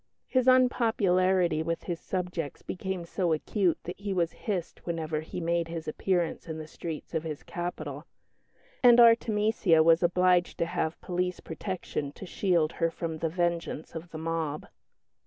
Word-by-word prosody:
His 255 -1 +1
unpopularity 190 -9 +3
with 165 +1 -2
his 170 -2 -4
subjects 180 -5 -4
became 190 -1 -4
so 170 -1 0
acute 180 +3 +1
that 175 - -7
he 200 -1 -3
was 170 -2 +1
hissed 185 -6 -4
whenever 160 -2 -2
he 160 - -6
made 170 0 0
his 165 -1 -6
appearance 175 +2 -1
in 160 -1 -4
the 155 - -6
streets 160 +1 -7
of 160 - 0
his 155 -3 -5
capital; 155 -4 -5 0.7
and 245 -1 +7
Artemesia 220 -7 +5
was 165 +1 +5
obliged 180 0 +3
to - - +1
have 160 -1 -2
police 180 0 -2
protection 160 -4 -4
to 190 - -9
shield 175 -4 +1
her 165 -1 0
from 165 -1 -5
the 165 - 0
vengeance 170 -2 -2
of 165 +1 -7
the 160 - -7
mob. 160 -2 -2
170 Hz, 155 wpm, -29 LUFS, 160-185 Hz, 0.7 s, and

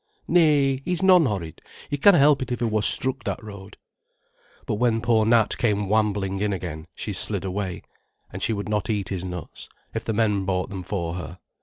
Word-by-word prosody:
"Nay, 145 -6 +3
he's 180 +2 -2
non 180 -5 +6
horrid; 85 -8 -5 0.3
he - - -2
canna 180 +6 +6
help 140 -1 +4
it 130 - -4
if 120 - -1
he 120 - 0
wor 110 -1 0
struck 130 +5 +2
that - - -4
road." 100 -2 -11 0.9
But 105 - -2
when 115 -1 +1
poor 115 -2 +2
Nat 115 -2 +2
came 105 -3 0
wambling 100 -2 0
in 105 -1 0
again, 85 -4 -6
she - - -5
slid - - +1
away. 95 -1 -4 0.5
And - - -6
she - - +1
would 100 -1 -3
not 105 0 -2
eat 100 -4 -1
his 95 -2 -3
nuts, 90 -3 -8 0.2
if - - -3
the 110 - -2
men 105 -3 +1
bought 95 +1 -2
them 95 -2 -5
for 85 -2 -4
her. 90 0 -7
105 Hz, 200 wpm, -24 LUFS, 95-120 Hz, 0.9 s, non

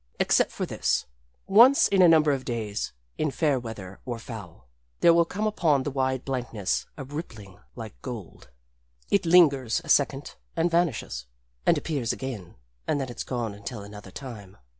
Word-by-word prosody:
Except - - +3
for - - -3
this: - - 0 0.4
Once 235 +8 +7
in 195 -1 +3
a 180 - +8
number 155 -2 +5
of 135 -2 -1
days, 110 -5 -3 0.3
in 155 - +1
fair 140 -2 +1
weather 105 -6 -8
or 120 -2 -4
foul, 100 - -10 0.3
there 170 - +7
will 170 0 +4
come 205 +5 -3
upon 160 -10 +2
the 145 - -3
wide 130 -1 -1
blankness 110 - -2
a - - -5
rippling 125 - -8 0.2
like 110 -4 -9
gold. 115 - -8 0.6
It 200 -4 +2
lingers 145 -8 +5
a 165 - -12
second 140 -1 +1 0.2
and 170 +1 +1
vanishes 140 - -1 0.4
and - - +5
appears 135 -8 -1
again. 120 -10 -6 0.3
And 145 - +1
then 135 -2 -3
it's 120 - -5
gone 120 -4 -3
until 100 +1 -7
another 105 -1 -11
time. 105 -5 -9
130 Hz, 165 wpm, -26 LUFS, 110-155 Hz, 0.6 s, a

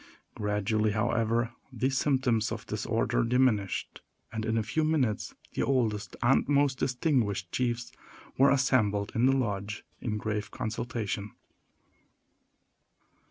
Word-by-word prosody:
Gradually, 105 +1 0
however, 115 +2 +1 0.2
these 130 +2 0
symptoms 130 -6 +1
of - - -5
disorder - - 0
diminished; 115 -5 +1 0.3
and 110 -1 -3
in 110 0 0
a 110 - +1
few 110 +9 0
minutes 140 -9 0 0.2
the - - -1
oldest 110 -6 0
and 130 +3 +4
most 140 -2 +3
distinguished 125 - 0
chiefs 120 -1 -1 0.4
were 135 +1 +5
assembled 110 -7 +2
in 120 +3 +3
the 135 0 +4
lodge, 105 -4 -2 0.2
in 105 -3 -2
grave 105 0 -2
consultation. 110 -2 -3
115 Hz, 115 wpm, -29 LUFS, 105-130 Hz, 0.4 s, were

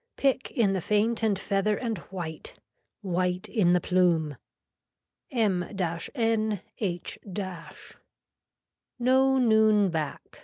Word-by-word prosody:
Pick 270 -1 +1
in 215 -7 +1
the 190 - -1
faint 215 +5 +1
and 215 -3 +2
feather 200 +1 0
and 230 -6 -3
white. 170 -4 -6 0.5
White 180 -1 -1
in 185 -7 +2
the 180 - +4
plume. 170 -5 +2 0.9
M 215 - +1 0.5
N 220 -4 +1 0.2
H. 175 -5 -3 1.8
No 265 +2 +3
noon 220 -4 +4
back. 155 -3 -5
205 Hz, 105 wpm, -27 LUFS, 180-225 Hz, 1.8 s, the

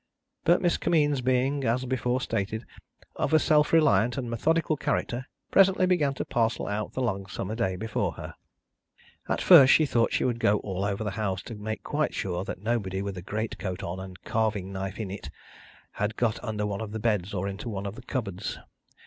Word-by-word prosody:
But, 175 +3 +4
Miss 175 - +3
Kimmeens 145 -5 +2
being, 130 +3 +1
as 125 +2 +1
before 125 0 0
stated, 110 0 -2 0.5
of - - 0
a - - +9
self 150 -1 +3
reliant 130 -7 +4
and 125 -3 -3
methodical 160 +7 +1
character, 125 -3 -2 0.2
presently 195 -1 +5
began 155 -7 +2
to - - -3
parcel 115 -1 0
out 105 +1 -3
the 130 - -1
long 100 -5 -2
summer 105 +1 -4
day 110 -5 0
before 110 +4 -2
her. - - -8 0.9
And - - 0
first 140 -7 +8
she 155 - +6
thought 120 -4 +2
she - - +1
would 120 -2 0
go 105 -2 +3
all 95 -1 -3
over 100 +1 -1
the 105 - -2
house, 95 -3 -2
to - - -8
make 105 -1 -5
quite 150 +1 -1
sure 90 -1 -2
that 95 - -6
nobody 100 -4 -1
with 100 -1 -4
a 90 - -6
great 110 +5 -4
coat 95 -2 -4
on 85 +2 -4
and 95 -1 -8
a - - -18
carving 110 -4 0
knife 95 +1 -4
in 105 -4 -4
it, 100 - -7 0.6
had 105 +1 -2
got 115 -2 0
under 105 -3 -2
one 100 0 -3
of 110 -1 -6
the 110 - -3
beds 105 -4 0
or 95 0 -2
into 100 +4 -5
one 100 -2 -4
of 100 - -4
the 120 - -10
cupboards. 105 -7 -4
110 Hz, 210 wpm, -27 LUFS, 100-130 Hz, 0.9 s, a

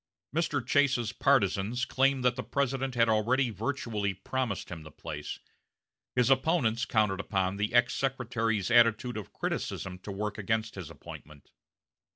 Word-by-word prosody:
Mr. - - 0
Chase's 130 -5 +2
partizans 120 -1 +2
claimed 135 0 +2
that 125 -1 +3
the 125 - -3
President 135 -1 -1
had 115 -1 +4
already 115 +4 +2
virtually 110 -3 -2
promised 120 0 -3
him 85 -3 -7
the 75 - -11
place; - - -6 0.8
his 125 +1 +3
opponents 130 -4 +2
counted 105 -4 +1
upon 95 -1 -1
the 105 +1 -1
ex 120 +1 +4
secretary's 115 -6 -1
attitude 120 +1 +4
of 105 -4 -6
criticism 90 -1 -3
to 100 - -7
work 105 +2 -3
against 110 +2 -1
his 90 -5 -7
appointment. 75 -1 -12
115 Hz, 145 wpm, -29 LUFS, 100-130 Hz, 0.8 s, had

